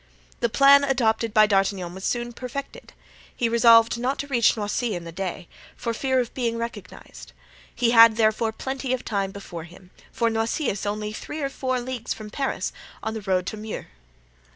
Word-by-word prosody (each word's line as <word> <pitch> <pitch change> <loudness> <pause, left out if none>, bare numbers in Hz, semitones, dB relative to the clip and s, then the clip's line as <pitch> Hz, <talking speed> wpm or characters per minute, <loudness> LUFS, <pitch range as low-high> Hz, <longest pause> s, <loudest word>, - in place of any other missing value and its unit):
The 235 - +1
plan 280 +4 +6
adopted 230 -5 +1
by 215 0 +6
D'Artagnan 195 -3 0
was 190 +1 -9
soon 240 0 -2
perfected. 255 +3 -7 0.4
He 235 - +1
resolved 230 0 +5
not 255 +3 -1
to 285 - -4
reach 240 -5 +3
Noisy 210 +2 -1
in 175 - -5
the 165 - -8
day, 180 0 -5 0.3
for 230 -1 -3
fear 260 +2 0
of 245 -2 -2
being 235 -3 -1
recognized; 230 -5 -8 0.4
he 235 -1 +2
had 230 -1 +8
therefore 220 0 +2
plenty 265 +2 -3
of 255 - -3
time 200 -2 -1
before 185 -4 -8
him, 180 +1 -16 0.2
for 230 -1 0
Noisy 225 +5 -1
is 205 +1 -5
only 210 +1 -3
three 300 +7 -6
or 275 - 0
four 260 -2 -2
leagues 245 -1 -4
from 215 -1 -9
Paris, 275 +3 -2 0.3
on 220 - -2
the 220 - -5
road 185 -2 0
to 215 - -5
Meaux. 215 0 -6
230 Hz, 185 wpm, -24 LUFS, 205-250 Hz, 0.4 s, had